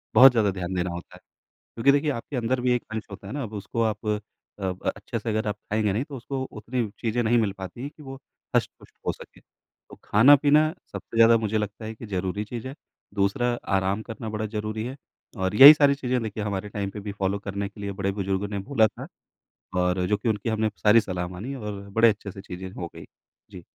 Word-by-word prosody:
बहुत 130 0 +10
ज़्यादा 110 -5 +2
ध्यान 95 -1 -4
देना 90 0 0
होता 85 0 -8
है, - - -14 0.6
क्योंकि 115 +4 +4
देखिए 145 +2 +2
आपके 135 +2 -6
अंदर 125 +2 0
भी 125 0 +2
एक 120 - -2
अंश 110 -1 -4
होता 100 0 -9
है 100 - -6
ना, 140 -4 -3
उसको 105 +2 -4
आप 110 -1 -2
अ, 105 -2 -4 0.2
अच्छे - - -5
से - - -4
अगर 110 0 -1
आप 105 - -1
खाएँगे 105 0 -1
नहीं 115 +6 0
तो 145 -3 -8
उसको 130 +2 -4
उतनी 115 +3 -3
चीज़ें 120 +1 0
नहीं 120 +2 +3
मिल 105 -3 +1
पाती 95 +6 -7
है 140 - -4
कि 150 0 -16
वो 135 0 -8 0.4
हष्ट-पुष्ट - - -2
हो - - +3
सके। - - -14
तो - - -21
खाना-पीना 145 +6 +6 0.3
सबसे 115 - -7
ज़्यादा 115 0 +7
मुझे 110 -1 -1
लगता 105 +1 -4
है 110 - -5
कि 115 - -9
ज़रूरी 95 0 -2
चीज़ 120 +3 -6
है 135 - -6 0.4
दूसरा 100 +5 +1 0.3
आराम 95 +2 0
करना 110 -1 -6
बड़ा 110 0 -3
ज़रूरी 110 +1 -3
है 130 +2 -5 0.4
और 95 +2 -1
यही 140 +7 +12
सारी 145 -2 +4
चीज़ें 125 -2 -1
देखिए 105 -1 -4
हमारे 100 0 -3
टाइम 100 -1 -3
पे 105 - -7
भी 100 0 -5
फ़ॉलो 100 0 -1
करने 100 0 -4
के 105 - -13
लिए 100 - -3
बड़े-बुजुर्गों 100 0 -2
ने 100 -1 -4
बोला 110 0 +3
था - - -10 0.7
और 90 0 +1
जो 105 - +2
कि 110 +3 -1
उनकी 105 +1 -1
हमने 110 0 +1
सारी 110 +2 +5
सलाह 90 -3 -3
मानी 100 +10 -6
और 105 -5 -6
बड़े 115 +3 +5
अच्छे 100 -2 -4
से 95 - -10
चीज़ें 95 0 -7
हो 85 -2 -6
गईं। - - -9 0.5
जी। 90 - -9
105 Hz, 220 wpm, -25 LUFS, 100-120 Hz, 0.7 s, यही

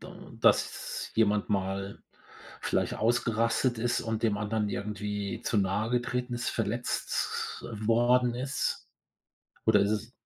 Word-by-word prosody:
da - - -11
dass - - +1
jemand 105 -2 +2
mal 95 0 -2 0.6
vielleicht - - 0
ausgerastet 115 +1 +1
ist 120 +1 +1
und 110 -1 -3
dem 105 -3 +2
anderen 105 0 -1
irgendwie 105 0 -3
zu 110 - +1
nahe 100 +3 0
getreten 125 0 -1
ist, 120 - -2
verletzt 115 +2 -2
worden 120 +3 +3
ist? 130 +3 -2 0.8
Oder 110 -2 +5
ist 100 +1 +2
es 110 +3 -2
110 Hz, 125 wpm, -29 LUFS, 105-120 Hz, 0.8 s, Oder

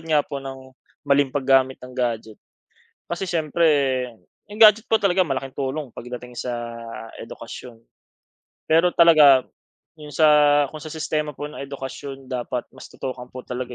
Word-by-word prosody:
nga 155 -2 +1
po 140 -2 -6
ng 135 -1 -9 0.3
maling 140 -2 +2
paggamit 135 -1 +2
ng 125 0 -11
gadget. 115 -3 -2 0.7
Kasi 175 +3 -3
siyempre, 165 -1 0 0.9
'yong 210 +2 -9
gadget 215 0 +8
po 225 - +4
talaga 190 -1 +3
malaking 135 -3 -4
tulong 140 +1 -3
pagdating 125 0 -8
sa 125 - -3 0.6
edukasyon. 115 +1 -10 0.9
Pero 165 +3 +4
talaga 150 -6 +7 0.6
yung 150 -1 -10
sa 150 -1 +5
kung 155 - -8
sa 155 - -8
sistema 155 -1 -2
po - - -6
ng 150 - -9
edukasyon 135 -1 -7
dapat 125 -1 -3
mas - - -12
tutukan 125 -1 -7
po 130 - -7
talaga 125 0 -5
140 Hz, 145 wpm, -23 LUFS, 130-155 Hz, 0.9 s, gadget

